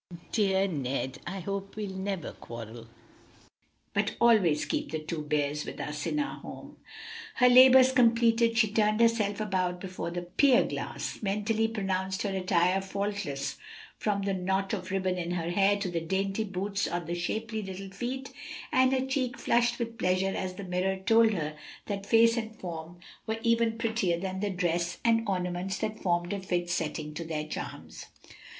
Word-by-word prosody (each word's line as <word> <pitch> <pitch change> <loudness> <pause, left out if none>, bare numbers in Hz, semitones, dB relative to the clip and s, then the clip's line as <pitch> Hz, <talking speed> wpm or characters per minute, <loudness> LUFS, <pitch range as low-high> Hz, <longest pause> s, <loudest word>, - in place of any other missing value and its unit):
Dear 195 -2 +2
Ned! 135 -5 -3
I 190 +2 -4
hope 195 +2 -4
we'll 210 -2 -4
never 190 -2 -3
quarrel, 115 0 -9 1.1
but - - 0
always 205 -10 +4
keep - - -2
the 155 - -2
two 155 +1 -4
bears 150 0 -1
with - - -7
us 150 0 -4
in - - -1
our 285 - -2
home." - - -10 0.6
Her 250 - +5
labors 255 +1 +8
completed, 230 -2 +4
she 220 -2 +4
turned 215 0 +2
herself 225 -3 +2
about 185 -4 -1
before 185 -2 -5
the 175 +1 -4
pier 255 +9 +4
glass, - - -5
mentally 215 +2 0
pronounced 190 -3 -2
her 200 -2 -1
attire 185 0 +2
faultless 195 -8 -3 0.4
from 200 -2 0
the 195 0 0
knot 190 +2 -1
of 185 -2 -3
ribbon 185 -1 0
in 170 -1 -3
her 170 -1 -2
hair 200 +2 +3
to 195 -3 -3
the 170 -1 -1
dainty 195 +5 -1
boots 200 +1 -2
on 175 -1 -3
the 170 - -3
shapely 220 +6 -2
little 195 0 -7
feet, 255 +6 -4 0.4
and 260 0 +4
her 260 0 +1
cheek 260 -2 -1
flushed 240 0 +2
with 230 0 -4
pleasure 185 +1 +1
as 185 -1 -3
the 200 - -7
mirror 185 +1 -1
told 225 +4 +4
her 155 -5 -3 0.3
that 200 -1 -4
face 230 +1 +5
and 220 -1 -4
form 170 -3 -7 0.3
were 220 0 -1
even 230 -1 +2
prettier 220 -7 0
than 190 +1 -3
the 205 +1 -1
dress 175 -2 -1
and 230 -1 +3
ornaments 180 +1 -2
that 215 0 -3
formed 175 0 0
a 200 - -2
fit 175 -2 -2
setting 155 -3 -2
to 165 +2 -5
their 155 -2 -3
charms. 155 - -7
195 Hz, 170 wpm, -29 LUFS, 175-225 Hz, 1.1 s, labors